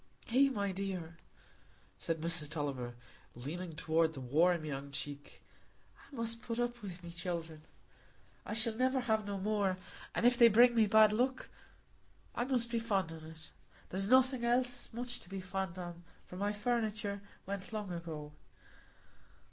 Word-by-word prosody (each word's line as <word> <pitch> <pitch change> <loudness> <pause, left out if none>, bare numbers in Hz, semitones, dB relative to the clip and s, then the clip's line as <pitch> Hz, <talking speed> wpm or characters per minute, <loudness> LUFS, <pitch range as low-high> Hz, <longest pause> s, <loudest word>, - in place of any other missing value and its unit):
"Eh, 275 +2 +6
my 200 -6 -1
dear," 185 -4 -4 0.8
said 165 -1 -2
Mrs 165 -2 0
Tulliver, 135 -6 -3 0.4
leaning 160 +7 -5
toward 160 0 +2
the 135 - -6
warm 155 +6 +3
young 140 -1 -4
cheek; 145 +1 -6 0.5
"I - - -15
must 230 -1 -1
put 230 -1 -4
up 240 0 -1
wi' 190 -4 -6
my 170 - -7
children,—I 170 +3 -8
shall 220 0 +3
never 260 +2 +2
have 220 -3 +1
no 200 -1 -2
more; 200 -1 +1 0.4
and - - +1
if 245 0 +5
they 235 - +10
bring 240 +2 +7
me 225 -2 +4
bad 215 0 +7
luck, 255 +4 0 0.8
I 240 - -1
must 245 -3 0
be 235 - +1
fond 195 -7 0
on 160 -1 -9
it. 160 0 -9 0.4
There's 195 +2 -1
nothing 260 +1 +5
else 245 +1 +1
much 245 +1 -3
to 175 - -11
be 195 0 -4
fond 185 -1 -3
on, 175 -1 -7 0.2
for - - -10
my 200 +2 0
furnitur' 210 -2 -1 0.2
went 200 +1 -5
long 210 -4 -4
ago. 160 -3 -6
195 Hz, 155 wpm, -34 LUFS, 165-230 Hz, 0.8 s, they